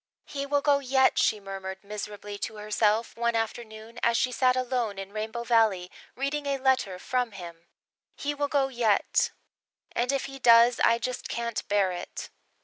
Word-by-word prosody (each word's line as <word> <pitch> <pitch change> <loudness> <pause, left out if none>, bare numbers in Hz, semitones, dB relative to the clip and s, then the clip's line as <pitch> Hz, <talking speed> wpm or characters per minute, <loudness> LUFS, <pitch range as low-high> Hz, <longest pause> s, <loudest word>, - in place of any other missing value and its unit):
"He 280 -1 -5
will 285 0 +1
go 285 -1 +3
yet," 265 -1 +3
she 215 - +2
murmured 195 -1 -7
miserably 205 0 -7
to 220 - -4
herself 215 +1 0
one 235 0 0
afternoon, 225 0 -4
as 235 0 +3
she 255 - +1
sat 255 0 +3
alone 245 -5 -1
in 195 +1 -7
Rainbow 220 +2 -4
Valley, 220 -7 +2 0.2
reading 280 +2 -2
a 275 -1 0
letter 260 -8 +1
from 245 +3 -2
him, 170 -3 -10 0.5
"he 290 +1 -2
will 290 0 -1
go 280 -1 +2
yet 235 -5 +2 0.6
and 245 +2 0
if 275 -1 -1
he 270 0 -8
does 235 0 +6
I 230 - +4
just 250 +1 -4
can't 235 -1 -3
bear 200 -2 +2
it." 175 -1 -7
230 Hz, 170 wpm, -27 LUFS, 205-260 Hz, 0.6 s, does